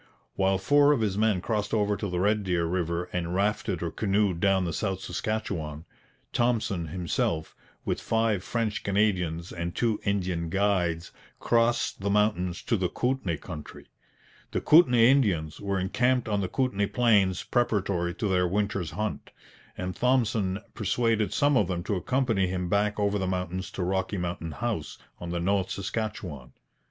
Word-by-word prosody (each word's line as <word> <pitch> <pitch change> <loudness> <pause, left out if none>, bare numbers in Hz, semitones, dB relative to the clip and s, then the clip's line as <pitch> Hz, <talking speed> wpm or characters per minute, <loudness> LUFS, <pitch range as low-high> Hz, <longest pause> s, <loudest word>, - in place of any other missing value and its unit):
While 95 0 +2
four 145 +9 +4
of 130 - 0
his 105 -3 0
men 105 -3 +2
crossed 105 +1 -1
over 105 -1 +1
to 100 -1 -4
the 90 0 -2
Red 105 +2 +2
Deer 90 -3 0
river 85 0 -1
and 90 0 -2
rafted 100 -2 0
or 85 - -2
canoed 100 -3 +1
down 95 -1 +3
the 85 - -2
South 95 +2 -2
Saskatchewan, 90 -6 -3 0.5
Thompson 110 -8 0
himself, 80 -1 -2 0.3
with - - -1
five 110 -4 +1
French 115 0 -2
Canadians 90 -5 0
and 85 0 -4
two 115 -3 +1
Indian 90 -5 -1
guides, 90 -3 0 0.3
crossed 120 0 +1
the 100 - -1
mountains 100 -4 +1
to 115 - +1
the 90 -2 0
Kootenay 125 -10 -1
country. 75 -2 -9 0.6
The - - 0
Kootenay 125 -8 +6
Indians 95 - +2
were 100 -1 -1
encamped 125 +7 +1
on 105 -2 0
the 95 - -2
Kootenay 105 -7 0
plains 100 -7 +2
preparatory 100 -8 0
to 110 - -2
their 90 -2 +2
winter's 100 -2 -1
hunt, 105 +4 -4 0.5
and 90 0 -4
Thompson 115 -6 +1
persuaded 110 +1 +1
some 145 0 +2
of 105 -8 +3
them 85 -2 -2
to 100 +2 -1
accompany 115 -2 +1
him 90 -1 -2
back 105 +2 +1
over 100 0 +1
the 95 - -1
mountains 90 0 -3
to 95 - -2
Rocky 95 +2 -1
Mountain 85 -3 -4
House 115 -5 -3 0.2
on 85 - -6
the 85 0 -2
North 95 +2 +1
Saskatchewan. 100 - -4
100 Hz, 160 wpm, -27 LUFS, 90-110 Hz, 0.6 s, Kootenay